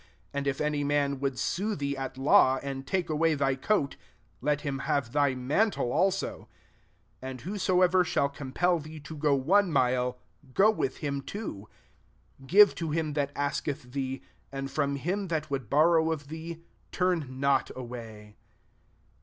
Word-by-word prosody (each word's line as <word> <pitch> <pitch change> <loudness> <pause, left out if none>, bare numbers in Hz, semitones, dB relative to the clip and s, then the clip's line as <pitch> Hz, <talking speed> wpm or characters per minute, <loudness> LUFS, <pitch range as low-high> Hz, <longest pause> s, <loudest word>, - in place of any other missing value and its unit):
40 - - -6
And 140 - -3
if 135 -1 -1
any 150 -1 0
man 140 -1 +1
would 135 -2 -1
sue 205 +10 -1
thee 140 -1 -2
at 135 -1 -5
law, 135 -1 +5
and 135 -1 -5
take 185 -2 0
away 160 +1 +2
thy 135 -2 +1
coat, 140 +2 0 0.4
let 150 -1 +1
him 140 -2 -3
have/Az/ 140 0 +1
mantle 140 - +1
also. 195 0 0 0.7
41 130 - -6
And 130 -2 -7
whosoever 185 - +2
shall 160 -4 +1
compel 145 +5 0
thee 155 +1 -9
io 160 - -7
go 145 -1 +2
one 180 +8 +3
mile, 125 -2 +1 0.4
go 210 +3 +6
with 135 -11 -2
him 140 -1 -2
two. 135 - -6 0.7
42 135 - -14
Give 205 +7 +7
to 165 -2 -4
him 155 -1 -1
that 140 -1 -1
ask 145 +2 -2
eth 130 -4 -4
thee; 135 0 -3 0.3
and 135 0 -5
from 140 -2 0
him 185 +8 -2
that 155 -3 -2
would 135 -2 -3
borrow 160 +2 +4
of 145 -3 -4
thee, 165 +1 -7 0.3
turn 165 -8 -1
not 140 0 +2
away. 115 -4 -9
145 Hz, 165 wpm, -28 LUFS, 135-165 Hz, 0.7 s, Give